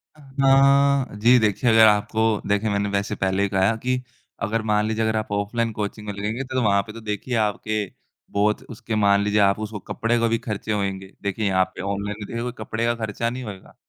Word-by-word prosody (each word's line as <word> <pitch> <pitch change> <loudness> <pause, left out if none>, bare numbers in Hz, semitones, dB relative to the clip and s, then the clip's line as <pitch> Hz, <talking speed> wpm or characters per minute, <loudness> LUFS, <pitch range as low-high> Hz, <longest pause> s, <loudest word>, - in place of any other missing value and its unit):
अ, 155 - -21 0.2
हाँ 140 -1 +4
जी 120 +3 +6
देखिए 110 +2 +1
अगर 110 0 +7
आपको 105 +1 +2 0.2
देखिए 105 +2 +1
मैंने 100 0 0
वैसे 100 0 -1
पहले 95 +1 0
ही 100 - 0
कहा 95 +3 +2
कि 125 0 +1 0.5
अगर 115 +1 -1
मान 105 0 +2
लीजिए 110 0 -1
अगर 110 0 0
आप 110 -1 -4
ऑफलाइन 115 +3 -1
कोचिंग 105 0 -4
में 105 - -3
लगेंगे 105 +6 -3
तो 130 0 -2
वहाँ 100 -2 +3
पे 105 - -10
तो 115 - -9
देखिए 110 +3 -3
आपके 110 +1 -2 0.5
बहुत 105 +1 +1
उसके 110 0 -5
मान 100 -1 +4
लीजिए 105 0 +1
आप 100 +1 +3
उसको 105 -1 -5
कपड़े 120 +1 0
का 115 - +2
भी 115 0 +1
ख़र्चे 110 -2 -4
होएँगे। 95 -2 -2
देखिए 100 +2 -2
यहाँ 95 -1 +3
पे - - -6
ऑनलाइन 100 +1 -3
देखिए 115 +3 -4
कपड़े 110 +1 -3
का 120 - +2
ख़र्चा 110 +2 -2
नहीं 125 +1 -6
होएगा। 100 -4 -10
105 Hz, 210 wpm, -23 LUFS, 100-115 Hz, 0.5 s, अगर